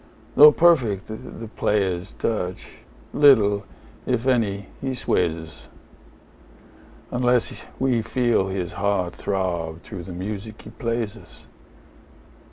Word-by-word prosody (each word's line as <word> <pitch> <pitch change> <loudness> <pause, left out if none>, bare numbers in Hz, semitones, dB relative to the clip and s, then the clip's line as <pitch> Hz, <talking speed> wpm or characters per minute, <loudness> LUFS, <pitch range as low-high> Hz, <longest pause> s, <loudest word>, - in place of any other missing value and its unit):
Though 150 +1 +10
perfect 130 - +3
the 115 0 -8
player's 100 -4 -1
touch, 90 -5 -4 0.3
little, 105 -9 +5 0.4
if 125 -1 0
any, 105 -7 +1
he 135 -1 -2
sways 85 -8 0
us, 80 -1 -11 1.4
Unless 125 -1 0
we 130 -3 +1
feel 115 -3 +1
his 95 -2 -3
heart 100 -3 -1
throb 85 -4 -3
through 95 -6 -8
the 95 - -8
music 105 +4 -6
he 110 - -11
plays 115 -2 -3
us. - - -14
105 Hz, 110 wpm, -23 LUFS, 95-120 Hz, 1.4 s, Though